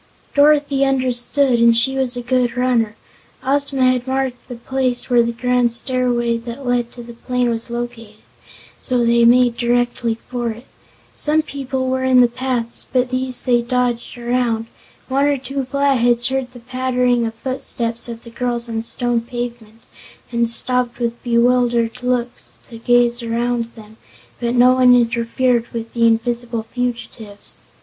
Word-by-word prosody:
Dorothy 285 -1 +3
understood 255 -1 +1
and 230 0 +5
she 265 +3 +5
was 255 -2 -1
a 245 - -5
good 245 -1 0
runner. 240 -4 +1 0.5
Ozma 270 -1 +2
had 250 0 -3
marked 260 -1 -3
the 250 - -7
place 255 +1 -2
where 240 -1 +5
the 235 0 0
grand 250 0 +1
stairway 240 -1 0
that 235 +3 -8
led 245 -1 0
to 240 - -10
the 235 0 -11
plain 250 +1 -1
was 230 +1 -4
located, 235 -3 -6 0.6
so 245 -2 0
they 235 0 +4
made 245 0 +4
directly 240 -1 0
for 240 -2 -3
it. 230 +3 -8 0.5
Some 310 +1 +2
people 265 -2 -4
were 260 0 -1
in 260 -1 +5
the 245 - +5
paths 240 -1 -3
but 255 0 0
these 255 0 +3
they 240 -2 +3
dodged 245 0 -2
around. 240 -2 -1 0.4
One 275 +2 +1
or 290 -1 +1
two 270 +1 -4
Flatheads 250 -3 +2
heard 265 -1 -3
the 250 - -13
pattering 250 -1 0
of 225 - -7
footsteps 240 -2 -1
of 230 0 -8
the 235 - -12
girls 240 0 -2
on 230 -1 -4
the 225 - -2
stone 240 0 -1
pavement 235 -2 -7 0.5
and 235 -1 0
stopped 250 +1 +3
with 235 -1 -3
bewildered 240 0 +1
looks 250 -1 -3
to 230 - -9
gaze 240 0 +2
around 235 +1 -1
them, 220 -1 -14 0.4
but 240 +1 -1
no 250 +1 +6
one 250 -1 +5
interfered 235 +1 +1
with 230 -1 -7
the 230 -1 +3
invisible 235 0 -1
fugitives. 230 -3 -4
245 Hz, 160 wpm, -18 LUFS, 235-255 Hz, 0.6 s, no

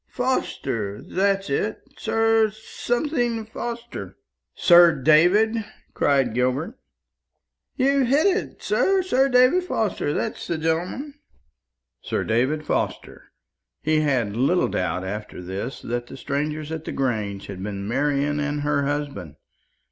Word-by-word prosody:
Forster 115 - -2
that's 195 0 0
it 205 +10 -1 0.2
Sir 225 -1 +2
something 240 +2 -2
Forster." 235 +2 -6 0.4
"Sir 175 -2 +7
David?" 180 - +4 0.3
cried 135 -5 +2
Gilbert. 130 - -1 1.0
"You've 275 -1 +2
hit 285 +7 +3
it, 395 +1 0
sir. 385 -1 +2
Sir 270 -6 +2
David 255 +8 +5
Forster 215 - -1
that's 220 +8 -3
the 170 - -1
gentleman." 180 - -2 0.8
Sir - - -2
David 130 +7 0
Forster! - - -3 0.5
He 155 0 +2
had 125 -9 0
little 140 +10 +2
doubt 90 0 -1
after 105 +2 -6
this 95 +8 -5
that 120 0 -3
the 135 - -10
strangers 150 +3 -3
at 160 -1 -5
the - - -4
Grange 105 -7 -2
had 95 -2 -8
been 100 0 -5
Marian 145 +4 0
and 145 0 -2
her 145 -1 0
husband. 140 - -4
155 Hz, 125 wpm, -23 LUFS, -, 1.0 s, Sir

